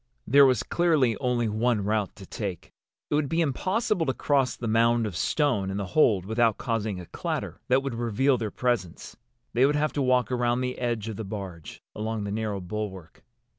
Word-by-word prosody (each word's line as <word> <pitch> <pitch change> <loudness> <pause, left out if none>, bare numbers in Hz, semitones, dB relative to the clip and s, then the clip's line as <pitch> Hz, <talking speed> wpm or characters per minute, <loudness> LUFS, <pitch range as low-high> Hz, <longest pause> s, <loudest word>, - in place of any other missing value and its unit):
There 140 +2 +7
was 130 -4 +2
clearly 155 -9 +2
only 125 -3 0
one 110 0 +1
route 105 -1 -1
to 100 - -11
take. 95 -3 -6 0.4
It - - +1
would 145 -2 +1
be 165 - 0
impossible 185 - 0
to 130 - 0
cross 140 -3 +1
the 120 - -5
mound 115 +1 +3
of 100 -5 -4
stone 115 - +1
in 95 - -3
the 100 - -2
hold 105 - +4
without 110 +1 +2
causing 110 -5 -2
a 90 - -8
clatter - - -4
that 130 +2 +3
would 135 -3 -3
reveal 120 +4 +1
their 110 -2 -2
presence. 115 -9 -2 0.4
They 120 - +3
would 145 +2 +4
have 150 +1 0
to 145 - -1
walk 130 -1 +2
around 120 0 +1
the 125 0 -3
edge 120 -3 -2
of 110 -3 -5
the 110 - -4
barge, 95 -6 -8
along 110 0 -3
the 100 - -4
narrow 105 -1 -2
bulwark. 95 -2 -6
115 Hz, 200 wpm, -26 LUFS, 105-130 Hz, 0.4 s, There